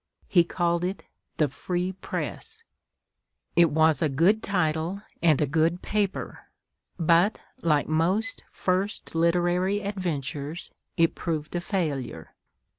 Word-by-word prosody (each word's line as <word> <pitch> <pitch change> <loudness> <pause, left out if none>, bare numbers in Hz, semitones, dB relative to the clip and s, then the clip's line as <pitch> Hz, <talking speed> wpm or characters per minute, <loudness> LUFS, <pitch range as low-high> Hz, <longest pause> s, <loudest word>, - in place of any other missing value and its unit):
He 175 -3 +5
called 170 0 0
it 185 +2 -3 0.3
the 155 - +3
"Free 175 +6 -2
Press." 445 - -6 0.9
It 170 -1 +6
was 160 +1 +3
a 155 - +2
good 175 +11 +3
title, 175 0 -1 0.2
and 160 -4 +4
a 150 - +3
good 160 +4 +1
paper; 205 -2 -2 0.5
but, 170 +4 +3 0.2
like 150 -3 +2
most 185 +7 +1
first 190 +3 -2
literary 175 +4 +2
adventures, 165 -6 -4 0.3
it 165 -1 +4
proved 155 -1 -3
a 175 - 0
failure. 145 - -3
170 Hz, 115 wpm, -26 LUFS, 155-185 Hz, 0.9 s, It